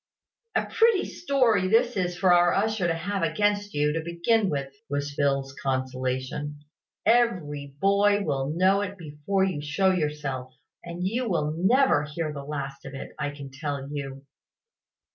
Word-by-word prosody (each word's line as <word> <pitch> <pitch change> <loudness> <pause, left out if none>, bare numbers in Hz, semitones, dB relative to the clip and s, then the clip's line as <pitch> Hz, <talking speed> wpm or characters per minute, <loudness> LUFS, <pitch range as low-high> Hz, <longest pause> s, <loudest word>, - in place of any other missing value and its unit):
"A - - +2
pretty 450 -4 +3
story 250 - +2
this 235 +4 +3
is 180 -2 -1
for 185 -1 +4
our 175 0 +4
usher 215 -2 +1
to 165 - +1
have 195 +4 -3
against 205 +5 0
you, 150 0 +2
to 165 - -1
begin 170 +6 +1
with," 140 -3 -3 0.2
was 145 0 -2
Phil's 140 -1 0
consolation. 130 +2 -3 0.4
"Every 170 - +1
boy 200 +2 +3
will 135 -5 -1
know 185 +5 +3
it 200 0 -4
before 165 +4 -1
you 185 -6 -1
show 165 +6 +2
yourself; 150 -6 -3 0.3
and 175 +1 -5
you 235 +3 -1
will 155 -4 0
never 220 - +4
hear 150 +1 -4
the 140 -1 -6
last 140 -1 -5
of 135 0 -8
it, 135 - -7
I 145 -1 -1
can 140 -2 -9
tell 140 -1 -4
you." 135 -2 -5
165 Hz, 160 wpm, -26 LUFS, 140-200 Hz, 0.4 s, for